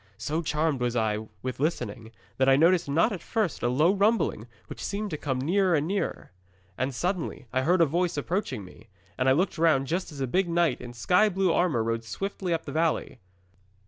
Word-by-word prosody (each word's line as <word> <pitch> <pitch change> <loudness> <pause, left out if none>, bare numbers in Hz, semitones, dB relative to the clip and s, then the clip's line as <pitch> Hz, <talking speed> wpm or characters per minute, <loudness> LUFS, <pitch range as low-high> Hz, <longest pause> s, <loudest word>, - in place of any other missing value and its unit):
So 150 +8 -2
charmed 150 -2 0
was 120 -1 0
I 110 -1 0 0.2
with 130 -1 -4
listening, 120 -7 -2 0.3
that 130 0 +3
I 135 - +6
noticed 165 +2 +3
not 165 +11 +3
at 180 - -6
first 215 -4 -2
a 120 - +1
low 150 +9 +3
rumbling 200 - +1 0.2
which - - -8
seemed 205 0 -3
to - - -2
come 135 -3 -2
nearer 180 +5 +2
and 150 +1 0
nearer. 195 - -3 0.4
'And 130 +6 -1
suddenly 175 -1 -2
I 130 - +2
heard 175 +6 +3
a - - +7
voice 170 +2 -1
approaching 145 - -2
me, 105 +4 -16 0.3
and 130 - +2
I - - +6
looked 170 +3 0
round 155 -5 +3
just 175 +5 -2
as 145 - -10
a 135 - 0
big 180 +8 0
knight 170 0 +1
in 120 -1 -8
sky 180 - +3
blue 190 -2 +1
armour 155 -11 +2
rode 115 0 -2
swiftly 190 - -4
up 165 -1 -1
the 140 - -6
valley. 160 -4 -1
155 Hz, 210 wpm, -27 LUFS, 130-180 Hz, 0.4 s, a